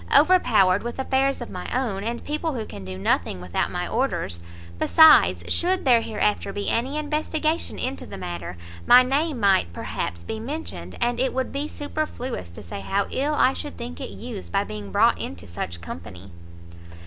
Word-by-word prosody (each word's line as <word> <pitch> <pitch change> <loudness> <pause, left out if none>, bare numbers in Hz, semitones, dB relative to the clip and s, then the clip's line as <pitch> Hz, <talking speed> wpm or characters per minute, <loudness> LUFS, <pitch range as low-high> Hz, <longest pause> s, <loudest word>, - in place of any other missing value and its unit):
overpowered 225 - +5
with 240 0 -5
affairs 270 0 +1
of 240 - -6
my 180 - -6
own, 225 -7 -1
and 235 +2 -4
people 305 +1 -2
who 225 -3 -3
can 100 - -9
do 95 0 -6
nothing 90 -1 0
without 90 -1 -1
my - - -3
orders. 85 - -1 0.4
Besides, 315 -1 +6
should 370 0 +1
there 240 -3 +6
hereafter 210 -2 0
be 205 0 -2
any 260 +6 0
investigation 310 +1 -1
into 260 +2 -3
the - - -8
matter, 85 0 -6 0.3
my 250 - +9
name 280 +2 0
might, 195 - +3
perhaps, 85 0 -4
be 220 - -5
mentioned, 290 +8 -6
and 240 0 0
it 260 0 0
would 260 0 -1
be 285 +2 -2
superfluous 290 - -4
to 85 - -10
say 85 - -7
how 195 - 0
ill 290 +3 0
I - - +4
should 85 -1 -7
think 80 0 -7
it - - -5
used 95 -2 -8
by - - +2
being 105 -2 -7
brought - - +4
into 85 -1 -6
such 85 0 -5
company." 85 +2 -9
230 Hz, 180 wpm, -24 LUFS, -, 0.4 s, my